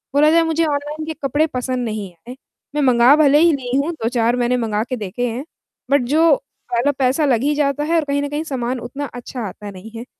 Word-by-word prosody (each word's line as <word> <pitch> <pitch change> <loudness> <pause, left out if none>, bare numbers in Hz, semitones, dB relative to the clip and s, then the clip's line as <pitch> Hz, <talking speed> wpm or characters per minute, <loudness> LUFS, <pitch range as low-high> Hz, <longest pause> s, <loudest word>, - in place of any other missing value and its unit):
बोला 300 +2 +5
जाए 335 +1 +5
मुझे 325 0 +1
ऑनलाइन 295 +1 -3
के 320 - -4
कपड़े 290 +4 +1
पसंद 255 -3 -3
नहीं 215 -4 -4 0.2
आए। 250 - -7 0.4
मैं 295 - +1
मँगा 250 0 +5
भले 295 -1 +5
ही 335 +1 +5
ली 255 -3 -3
हूँ 285 +4 0
2-4 235 0 +1
मैंने 245 0 +1
मँगा 220 -3 -1
के 255 - -1
देखे 220 +4 -3
हैं 240 +4 -4 0.5
बट 280 -1 +4
जो 330 +5 +5 0.4
पहला 240 +4 +2
पैसा 265 +4 +2
लग 245 -5 +2
ही 295 +1 +2
जाता 290 0 0
है 325 +3 0
और 325 - +3
कहीं 285 0 0
न 285 - -3
कहीं 295 +2 -3
सामान 255 -4 -3
उतना 275 +5 -5
अच्छा 245 +1 -7
आता 205 +2 -8
नहीं 195 +3 -11
है 230 +1 -7
270 Hz, 230 wpm, -19 LUFS, 240-295 Hz, 0.5 s, बोला